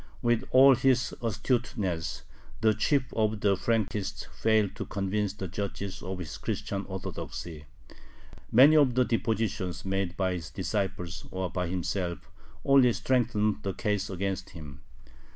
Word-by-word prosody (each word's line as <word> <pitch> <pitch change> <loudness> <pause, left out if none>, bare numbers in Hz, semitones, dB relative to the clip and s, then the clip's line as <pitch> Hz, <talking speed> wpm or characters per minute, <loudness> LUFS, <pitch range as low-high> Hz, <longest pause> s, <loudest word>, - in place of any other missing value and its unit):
With 120 -1 +2
all 135 +1 +8
his 125 -1 +2
astuteness, 110 -6 -1 0.4
the 110 -1 +4
chief 130 +5 0
of 110 -1 0
the 100 -1 +3
Frankists 105 -1 -1
failed 110 -3 +2
to - - -4
convince 100 0 -1
the 95 -2 -5
judges 100 +1 -5
of 95 0 -5
his 90 -5 -7
Christian 100 0 -3
Orthodoxy. 85 -4 -6 0.9
Many 140 +7 +7
of 135 -5 +4
the 125 0 +4
depositions 110 -6 -1
made 95 -2 -2
by 95 -1 +1
his 85 -2 -5
disciples 95 -3 -3
or 95 -1 -3
by 90 -1 -2
himself 90 0 -3 0.3
only 135 -3 +6
strengthened 110 -5 +1
the 95 -2 -3
case 105 -1 -1
against 95 0 -3
him. 75 -5 -11
100 Hz, 135 wpm, -28 LUFS, 95-115 Hz, 0.9 s, all